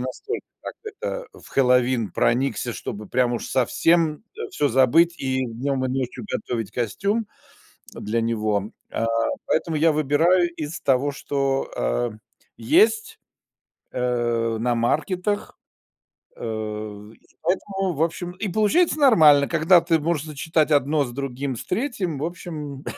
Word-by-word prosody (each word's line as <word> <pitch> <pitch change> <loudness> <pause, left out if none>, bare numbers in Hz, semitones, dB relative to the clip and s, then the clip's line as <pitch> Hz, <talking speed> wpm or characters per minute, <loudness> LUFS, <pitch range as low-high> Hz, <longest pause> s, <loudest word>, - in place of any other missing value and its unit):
настолько, 130 - -5 0.2
так - - -6
это, - - -5
в - - -16
Хэллоуин 125 -4 +3
проникся, 125 0 +1
чтобы 105 +1 -6
прям 125 -1 +1
уж - - -4
совсем 155 - +2 0.3
всё 145 - +1
забыть 135 +8 +4
и 130 -1 -1
днем 130 +3 -2
и - - 0
ночью 130 - -3
готовить 115 - -3
костюм 200 - -1 0.7
для 115 +3 -2
него. 110 -2 -1 0.2
А, 115 - -1 0.4
поэтому 165 -3 0
я 160 +1 +4
выбираю 160 +5 +3
из 155 +1 -5
того, 140 +1 +2
что, 135 -1 -1
э, - - 0 0.5
есть, 440 - +2 0.7
э, 120 -2 0
на 120 +1 +1
маркетах. 180 - -1 0.8
Э, 105 -1 -5
и - - -25 0.2
поэтому, 195 +1 -1
в 155 - +1
общем, 175 +2 -3
и 195 +2 -4
получается 300 - +2
нормально. 155 - +6
Когда 170 +2 +5
ты 165 -2 +2
можешь 155 -1 -1
сочетать 155 +1 0
1 145 0 +3
с 120 - -7
другим, 135 0 -3
с - - -6
3, 190 - -2
в 150 - -1
общем, 150 -5 -6
140 Hz, 135 wpm, -23 LUFS, 120-175 Hz, 0.8 s, нормально